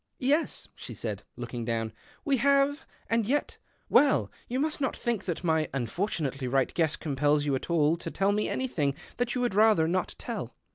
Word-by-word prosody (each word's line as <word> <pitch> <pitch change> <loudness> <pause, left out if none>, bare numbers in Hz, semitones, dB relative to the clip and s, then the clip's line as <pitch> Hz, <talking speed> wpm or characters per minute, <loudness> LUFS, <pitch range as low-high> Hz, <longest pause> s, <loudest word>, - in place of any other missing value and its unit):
" - - -51
Yes," 290 +5 +1
she - - -8
said, - - -4
looking 120 -2 -5
down, 115 -1 -2 0.2
" - - -28
we 275 -2 +3
have. 280 +3 +2 0.2
Lnd 230 -2 +2
yet 290 +4 -1
— - - -40
well, 285 -1 +3 0.2
you 250 +2 -2
must 310 +2 0
not 265 - 0
think 235 -5 -2
that 175 -1 -3
my 160 -3 +2
nfortunately 135 - -2
right 135 -1 +2
guess 160 -2 +2
compels 145 0 +1
you 145 - +1
at 130 - -3
all 160 -1 +3
tell 195 +3 0
me 210 +1 0
anything 155 - 0 0.2
that 245 0 0
you 250 - 0
would 245 -4 +1
rather 210 -5 +5
ot 180 +1 -1
tell." - - -5
185 Hz, 195 wpm, -28 LUFS, -, 0.2 s, rather